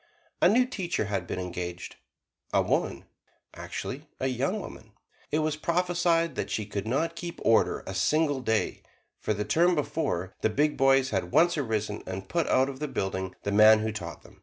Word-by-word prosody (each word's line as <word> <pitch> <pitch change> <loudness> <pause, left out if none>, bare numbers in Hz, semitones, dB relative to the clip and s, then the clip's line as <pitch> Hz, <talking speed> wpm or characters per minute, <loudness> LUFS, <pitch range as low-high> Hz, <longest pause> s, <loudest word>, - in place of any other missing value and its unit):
A 175 - +7
new 245 +5 +4
teacher 185 - -2
had 100 -3 -3
been - - -4
engaged 90 -1 -5 0.5
a - - +3
woman, - - -1 0.5
actually - - -6
a - - -1
young 135 - 0
woman. 110 - -10 0.4
It 150 - +2
was 155 -1 0
prophesied 170 -1 +1
that - - -3
she 105 - -2
could 100 0 -4
not 165 +8 0
keep 170 0 -6
order 115 - +3
a - - -5
single 155 -3 +2
day, 110 -3 0 0.4
for 110 - -1
the 105 +1 -2
term 175 +2 +3
before, 140 - -2
the - - +2
big 150 +7 +1
boys 135 0 +4
had 95 -3 -1
once 170 +1 +4
arisen 110 -7 -2
and 95 +1 -5
put 170 -2 0
out 130 +1 +3
of 135 -1 -7
the 150 - -2
building 95 -6 -3
the 100 - -1
man 110 +1 +7
who 110 0 -1
taught 85 -6 -7
them. - - -18
130 Hz, 185 wpm, -28 LUFS, 105-165 Hz, 0.5 s, A